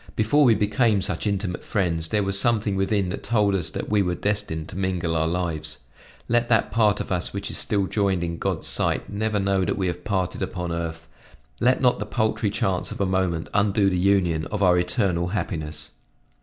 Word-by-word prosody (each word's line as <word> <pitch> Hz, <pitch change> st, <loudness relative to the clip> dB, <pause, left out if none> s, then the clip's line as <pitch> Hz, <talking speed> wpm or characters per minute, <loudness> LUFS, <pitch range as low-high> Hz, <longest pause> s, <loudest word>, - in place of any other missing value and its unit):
Before 115 Hz, +7 st, +3 dB
we 115 Hz, -3 st, +5 dB
became 105 Hz, 0 st, +2 dB
such -, -, -2 dB
intimate 95 Hz, -3 st, -2 dB
friends 85 Hz, -5 st, -1 dB
there 105 Hz, +4 st, +1 dB
was 100 Hz, 0 st, +2 dB
something 110 Hz, -3 st, +1 dB
within 95 Hz, 0 st, 0 dB
that 90 Hz, -, -4 dB
told 105 Hz, -4 st, +1 dB
us 85 Hz, -4 st, -1 dB
that -, -, -5 dB
we 105 Hz, -1 st, +2 dB
were 90 Hz, -2 st, 0 dB
destined 100 Hz, -7 st, -2 dB
to -, -, -7 dB
mingle 90 Hz, -3 st, -1 dB
our 80 Hz, 0 st, +1 dB
lives. 85 Hz, -4 st, -2 dB, 0.5 s
Let 120 Hz, 0 st, +1 dB
that 115 Hz, -3 st, +3 dB
part 105 Hz, -3 st, +3 dB
of -, -, -5 dB
us 90 Hz, -1 st, -1 dB
which 100 Hz, 0 st, -4 dB
is -, -, -3 dB
still 100 Hz, -2 st, +1 dB
joined 95 Hz, -3 st, 0 dB
in 85 Hz, -1 st, -4 dB
God's -, -, -2 dB
sight -, -, +1 dB
never 105 Hz, +1 st, -1 dB
know 95 Hz, -1 st, +1 dB
that -, -, -1 dB
we 95 Hz, -, -1 dB
have 90 Hz, 0 st, -3 dB
parted 95 Hz, -2 st, -2 dB
upon 90 Hz, -2 st, -3 dB
earth; 80 Hz, -1 st, -4 dB, 0.5 s
let 125 Hz, +2 st, +3 dB
not 125 Hz, -4 st, +3 dB
the 105 Hz, -, -4 dB
paltry 110 Hz, -1 st, 0 dB
chance 95 Hz, -3 st, -1 dB
of -, -, -7 dB
a 100 Hz, -, +2 dB
moment 95 Hz, -3 st, 0 dB
undo 100 Hz, -1 st, +2 dB
the -, -, 0 dB
union 90 Hz, -4 st, +2 dB
of 105 Hz, -1 st, -2 dB
our 90 Hz, -1 st, +5 dB
eternal 90 Hz, 0 st, 0 dB
happiness!" 85 Hz, -5 st, -4 dB
95 Hz, 205 wpm, -24 LUFS, 90-105 Hz, 0.5 s, we